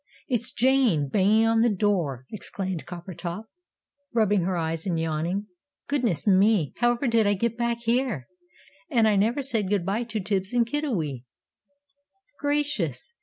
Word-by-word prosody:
It's 240 -4 0
Jane, 245 - +2
banging 210 +6 +3
on 225 0 +3
the 235 - +4
door," 180 - 0
exclaimed 190 -7 -5
Coppertop, 175 +2 -6 0.7
rubbing 210 -4 +3
her 185 -1 -1
eyes 165 +1 -2
and 170 -3 0
yawning. 165 +5 -1 0.4
"Goodness 250 - 0
me! 195 -5 +3
however 240 +2 +1
did 230 -3 +3
I 205 - +3
get 230 +3 -1
back 235 0 -1
here? 235 - 0 0.6
And 230 -3 +3
I 210 - +3
never 230 +8 +1
said 225 -8 0
good 200 -4 0
bye 210 +5 -1
to 225 -1 -4
Tibbs 195 +1 -1
and 240 -1 +3
Kiddiwee! 200 - -2 1.1
"Gracious!" 290 - -1
210 Hz, 145 wpm, -26 LUFS, 175-235 Hz, 1.1 s, the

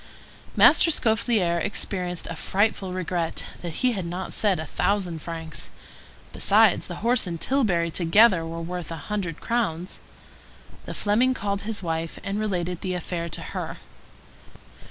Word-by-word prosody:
Master - - +7
Scaufflaire 220 - +2
experienced 180 -3 -1
a 165 - -5
frightful 195 +1 0
regret 180 -2 -2 0.2
that 170 +7 -3
he 250 - +5
had 195 -5 -3
not 180 +2 -5
said 200 -6 +2
a 160 - -4
thousand 180 -1 -1
francs. 165 -1 -7 0.6
Besides 210 -1 +4
the 175 - -6
horse 240 -4 +4
and 170 -2 -4
tilbury 180 - +1
together 180 +3 +5
were 165 +1 -5
worth 175 0 -5
but 165 - -4
a 150 - -10
hundred 180 -6 -3
crowns. 185 -7 -2 0.9
The - - -6
Fleming 240 +5 +2
called 200 0 -3
his 210 -3 -4
wife, 165 -1 -3
and 200 +1 -2
related 180 -4 -2
the 185 -1 -2
affair 170 -1 -4
to - - -4
her. - - -4
180 Hz, 150 wpm, -25 LUFS, 170-210 Hz, 0.9 s, Master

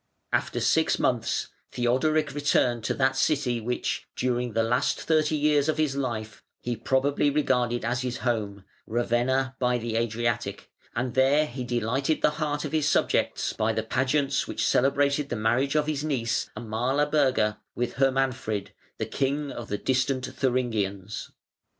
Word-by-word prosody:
After - - 0
six - - +2
months - - 0 0.2
Theodoric 145 +5 +1
returned 125 -5 +1
to - - 0
that 130 -1 +2
city, 135 -4 +1
which, 125 +2 -2
during 125 -2 -1
the 115 - +2
last 120 +2 +1
thirty 155 -1 +2
years 150 0 +2
of 155 - +1
his 155 -3 +1
life, 115 -6 -3 0.2
he 120 0 -3
probably 135 +5 +1
regarded 125 -5 +1
as 120 +2 0
his 125 -1 -3
home 105 -5 -1 0.2
Ravenna 120 +3 0
by 125 -1 +2
the 115 -1 -2
Adriatic, 115 0 -2 0.2
and 125 0 -1
there 135 +4 +4
he 130 -2 -6
delighted 125 +5 -1
the - - +5
heart 150 -1 -1
of - - -4
his 155 -2 +2
subjects - - +1
by 110 +1 0
the 110 - -1
pageants 135 +4 0
which - - -1
celebrated 140 +2 +2
the - - -2
marriage 120 +6 +1
of 150 -1 +3
his 150 -2 -2
niece 125 -7 -1
Amalaberga 125 -1 +1 0.2
with 120 -1 -2
Hermanfrid, 130 -6 0 0.3
the 110 - -2
king 140 +5 -1
of 120 - -7
the 105 - -2
distant 130 +1 0
Thuringians. 110 -7 -2
130 Hz, 150 wpm, -26 LUFS, 115-140 Hz, 0.3 s, the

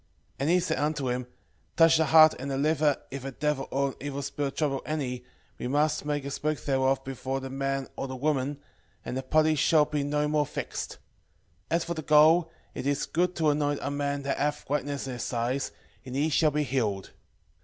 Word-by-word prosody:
6:7 - - -39 0.3
And 140 +3 0
he 180 +1 +5
said 170 -2 -1
unto 145 -3 0
him, 125 0 -3 0.5
Touching 165 -1 +6
the 160 - +2
heart 155 +1 +8
and 135 +2 -4
the 135 - -1
liver, 150 0 +2
if 135 -1 -6
a 135 - -4
devil 150 0 -1
or 140 +1 0
an 135 - -9
evil 140 0 -4
spirit 140 0 -3
trouble 140 -3 0
any, 130 -5 -3 0.4
we - - -3
must 150 +3 +1
make 145 -2 -1
a 140 - -4
smoke 150 +2 -1
thereof 135 -1 +1
before 135 0 -3
the 135 0 -7
man 135 0 -2
or 135 - -4
the 130 - -6
woman, 140 0 0 0.5
and - - -4
the 130 - -1
party 155 +4 +3
shall 155 +1 +4
be 150 -1 -2
no 150 +1 0
more 150 -1 +1
vexed. - - -5 0.8
6:8 - - +2
As 170 - +1
for 170 - -3
the 160 - -5
gall, 155 +3 +5 0.2
it 130 - -4
is 140 0 0
good 180 +2 0
to 155 -2 +3
anoint 145 -1 0
a 140 - -2
man 140 0 -2
that 140 - -2
hath 145 +1 -1
whiteness 145 -1 -2
in 130 - -4
his 125 - -4
eyes, 120 +3 -1 0.3
and 130 0 -7
he 145 +3 +1
shall 155 +1 +3
be 150 +1 0
healed. 115 -8 -1
145 Hz, 220 wpm, -28 LUFS, 135-155 Hz, 0.8 s, heart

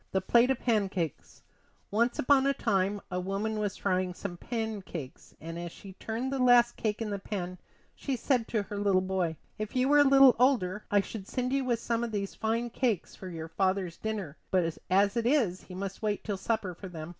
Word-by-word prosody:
THE 190 - +3
PLATE 235 +6 +4
OF 265 - +1
PANCAKES 195 - -1 0.5
Once 235 +4 +2
upon 275 0 +4
a 275 - +2
time 195 -3 0
a 180 - -1
woman 200 +4 -2
was 205 -2 -2
frying 185 -2 0
some 180 -2 -5
pancakes, 205 - -5
and 165 +2 -6
as 170 -1 -5
she 195 +2 -11
turned 230 +7 -4
the 270 - -1
last 245 -1 +5
cake 215 0 -2
in 210 - -4
the 200 - -2
pan 185 -3 -5 0.3
she 275 - -3
said 245 -1 +1
to 215 -3 0
her 205 0 -6
little 200 -2 +3
boy: 185 -3 -1 0.2
"If 215 +4 -4
you 255 +1 +3
were 290 +1 +5
a - - +8
little 270 -2 +7
older 215 -7 +2
I 205 -1 +4
should 200 -1 -8
send 250 0 -2
you 275 -1 +1
with 240 -2 +1
some 235 0 -1
of 235 - -3
these 200 -2 -3
fine 230 +2 -1
cakes 230 -7 -1
for 190 - -9
your 165 -2 -6
father's 185 0 0
dinner, 205 -9 -4
but 170 -3 +1 0.2
as 200 +3 +3
it 235 0 +1
is, 235 -10 +2
he 180 - -10
must 195 +1 -5
wait 210 -2 -1
till 205 -3 -3
supper 205 -2 -1
for 190 +3 -9
them." 165 -3 -7
205 Hz, 215 wpm, -30 LUFS, 185-235 Hz, 0.5 s, a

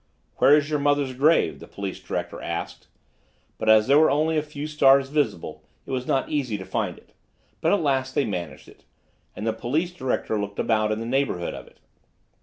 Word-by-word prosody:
"Where 145 +2 +6
is 145 -1 0
your 150 -1 -1
mother's 145 -2 +1
grave?" 130 - +2
the - - -11
police 100 -2 -6
director - - -5
asked; - - -5 0.7
but 110 - 0
as 110 0 +6
there 140 +4 +5
were 155 - +5
only 155 +3 +1
a 155 - +2
few 150 -1 -7
stars 135 -3 +4
visible, 140 - -2 0.2
it - - -8
was 130 -1 -3
not 135 - +1
easy 130 -8 -2
to 95 - -8
find - - -2
it, - - -21 0.5
but - - +2
at 205 - +2
last 135 -3 0
they 140 - +2
managed 90 -7 -5
it, - - -18 0.5
and 105 - -5
the 115 - +1
police 150 +10 -1
director 130 - -2
looked 100 0 -6
about 110 -2 +1
in 110 - -1
the 115 - -4
neighborhood 125 -8 -1
of - - -9
it. - - -21
135 Hz, 205 wpm, -24 LUFS, 110-145 Hz, 0.7 s, Where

